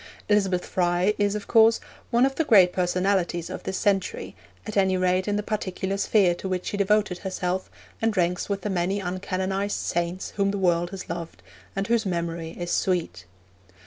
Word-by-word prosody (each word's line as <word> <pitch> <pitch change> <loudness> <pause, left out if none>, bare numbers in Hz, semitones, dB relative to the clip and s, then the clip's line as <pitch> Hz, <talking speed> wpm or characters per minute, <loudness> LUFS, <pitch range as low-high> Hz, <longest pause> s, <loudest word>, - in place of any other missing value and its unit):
Elizabeth 195 -4 +2
Fry 180 +2 +1
is, 205 0 +2
of 210 -1 -4
course, 225 0 +5 0.3
one 240 +2 +4
of 270 - 0
the 320 - 0
great 190 - +6
personalities 180 -1 0
of - - -5
this 190 - -3
century, 200 -3 -1 0.3
at 215 - -6
any 190 -2 +3
rate 185 +1 +1
in 205 - +1
the 210 - -1
particular 195 -2 -2
sphere 200 -2 +3
to 190 +2 -6
which 185 -1 -2
she - - -3
devoted 200 -2 +2
herself, 185 -1 -3 0.3
and 225 -2 +1
ranks 180 +2 0
with 200 -1 -1
the 210 - -3
many 190 +2 0
uncanonised 190 +2 -2
saints 175 +2 -2
whom 200 -1 +2
the 200 - -1
world 175 -2 +2
has 190 0 -7
loved, 170 0 -6 0.3
and 195 0 -1
whose 230 +1 +2
memory 170 -2 -3
is 175 0 -3
sweet. 165 - -1
190 Hz, 180 wpm, -25 LUFS, 180-205 Hz, 0.3 s, great